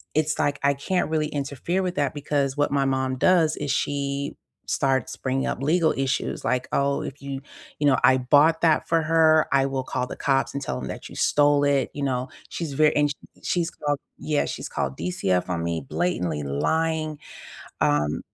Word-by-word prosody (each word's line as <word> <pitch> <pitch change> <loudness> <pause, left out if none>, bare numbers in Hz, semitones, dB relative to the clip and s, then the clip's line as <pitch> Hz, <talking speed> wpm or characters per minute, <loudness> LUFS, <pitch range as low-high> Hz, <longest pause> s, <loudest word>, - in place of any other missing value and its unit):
it's 155 0 +1
like, 145 -1 +1
I 140 0 +4
can't 165 +5 -1
really 155 -1 +1
interfere 145 +6 -2
with 180 -1 -1
that 140 -5 0
because 145 -1 -1
what 145 - +1
my 140 -1 +2
mom 130 -1 0
does 165 0 +3
is 145 - -4
she 140 0 -2 0.3
starts 135 -3 0
bringing 135 0 -1
up - - -3
legal 160 +3 +2
issues. 135 0 -1
Like, 125 +2 0
"Oh, 140 0 +1
if 140 - -7
you 140 -1 -5 0.4
you 145 - +1
know, 130 - +4
I 130 - +6
bought 145 +6 +4
that 160 -2 +3
for 165 -1 +2
her. 160 -1 +4
I 135 -1 +3
will 135 -1 -2
call 125 0 -2
the - - -6
cops 135 -1 +1
and 140 - -3
tell 65 - -3
them 65 - -5
that - - -7
you - - -11
stole 145 0 +3
it." 140 -2 +1
You 145 - -4
know? 130 -2 -1 0.2
She's 160 -4 -4
very 150 +2 +3
and 145 0 +3
sh - - -3 0.3
she's 170 -2 0
called 145 -1 -2 0.2
yeah, 150 -1 0
she's - - -5
called 70 -1 -3
DCF 90 +1 -1
on 85 -2 -1
me, 85 -1 -2
blatantly 90 - -1
lying, 155 - -1 0.6
um, 75 +1 +1
140 Hz, 195 wpm, -24 LUFS, 130-155 Hz, 0.6 s, I